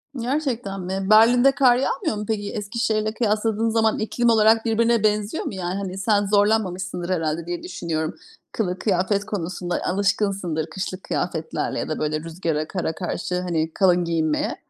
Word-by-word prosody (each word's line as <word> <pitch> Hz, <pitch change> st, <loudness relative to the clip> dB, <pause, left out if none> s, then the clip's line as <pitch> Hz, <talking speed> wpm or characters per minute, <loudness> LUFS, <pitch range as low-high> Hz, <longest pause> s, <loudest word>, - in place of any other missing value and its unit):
Gerçekten 245 Hz, -6 st, -2 dB
mi? 190 Hz, +1 st, -3 dB
Berlin'de 245 Hz, +5 st, +6 dB
kar 260 Hz, -3 st, +4 dB
yağmıyor 275 Hz, -, -1 dB
mu? 210 Hz, -, -4 dB
Peki, 205 Hz, -2 st, -2 dB
Eskişehir'le 215 Hz, 0 st, -1 dB
kıyasladığın 220 Hz, 0 st, 0 dB
zaman 220 Hz, -1 st, +2 dB
iklim 235 Hz, +2 st, +1 dB
olarak 225 Hz, 0 st, +4 dB
birbirine 230 Hz, 0 st, +2 dB
benziyor 210 Hz, +5 st, 0 dB
mu? -, -, -4 dB
Yani, 180 Hz, -1 st, -3 dB
hani, 190 Hz, -1 st, -4 dB
sen 205 Hz, +1 st, +2 dB
zorlanmamışsındır 195 Hz, -3 st, +1 dB
herhâlde 165 Hz, -2 st, -1 dB
diye 175 Hz, 0 st, -4 dB
düşünüyorum. 160 Hz, -3 st, -3 dB, 0.4 s
Kılık 185 Hz, -4 st, -2 dB
kıyafet 200 Hz, 0 st, +1 dB
konusunda 180 Hz, -3 st, -3 dB
alışkınsındır, 195 Hz, -4 st, 0 dB
kışlık 185 Hz, +2 st, -5 dB
kıyafetlerle 160 Hz, -3 st, -2 dB
ya -, -, -4 dB
da, 155 Hz, -, -2 dB
böyle, 155 Hz, 0 st, -1 dB
rüzgara, 160 Hz, -1 st, -3 dB
kara 175 Hz, -4 st, -2 dB
karşı, 180 Hz, 0 st, -3 dB
hani, 165 Hz, -3 st, -1 dB
kalın 180 Hz, -2 st, +3 dB
giyinmeye. 160 Hz, -2 st, 0 dB
195 Hz, 150 wpm, -23 LUFS, 175-220 Hz, 0.4 s, Berlin'de